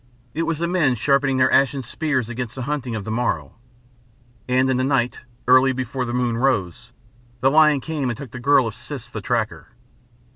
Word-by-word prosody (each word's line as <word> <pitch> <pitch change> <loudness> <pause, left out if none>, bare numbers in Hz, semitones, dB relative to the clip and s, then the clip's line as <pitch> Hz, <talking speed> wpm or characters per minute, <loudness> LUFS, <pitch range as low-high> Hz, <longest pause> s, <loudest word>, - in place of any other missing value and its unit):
It 165 +2 -2
was 165 - -1
the 170 +2 -1
men 170 -8 +2
sharpening 135 +2 +2
their 130 0 +3
ashen 135 0 +3
spears 130 -1 -2
against 120 -1 -5
the 130 - -5
hunting 130 -4 -3
of 105 - -4
the 110 - -5
morrow. 120 +2 -1 1.0
And 130 +1 +3
in 130 -1 +1
the 130 - 0
night, 130 -3 0 0.3
early 130 +1 +5
before 130 0 -3
the 120 - -4
moon 120 -2 0
rose, 115 -3 -1 0.5
the 135 +2 +4
lion 150 -2 +5
came 150 -4 -2
and 120 - -3
took 135 -4 -9
the 125 - -7
girl 135 0 +4
of 110 - -4
Siss 125 -2 -8
the 110 - -5
Tracker. 115 +1 -2
130 Hz, 195 wpm, -22 LUFS, 120-140 Hz, 1.0 s, early